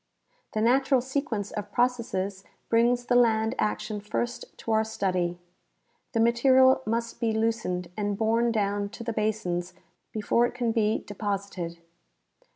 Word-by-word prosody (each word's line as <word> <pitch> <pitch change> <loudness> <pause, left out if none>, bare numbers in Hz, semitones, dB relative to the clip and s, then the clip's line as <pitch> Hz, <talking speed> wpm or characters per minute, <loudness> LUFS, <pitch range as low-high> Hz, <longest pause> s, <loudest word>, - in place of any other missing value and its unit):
The 215 - 0
natural 265 +3 +4
sequence 250 -5 -2
of 205 - -5
processes 225 -6 0 0.3
brings 240 +1 +3
the 245 - +1
land 225 -2 +3
action 215 0 -1
first 235 +3 -4
to 225 - -4
our 220 0 +3
study. 185 -5 -1 0.8
The 230 - +1
material 260 +3 +5
must 230 +1 -2
be 230 -2 +1
loosened 220 -6 -1
and 205 -1 -1
borne 230 +2 +2
down 205 -2 0
to - - -7
the 230 0 -3
basins 185 -5 -2 0.4
before 230 +2 +2
it - - -10
can 240 -2 0
be 220 -1 +1
deposited. 200 -4 -4
220 Hz, 140 wpm, -27 LUFS, 205-235 Hz, 0.8 s, material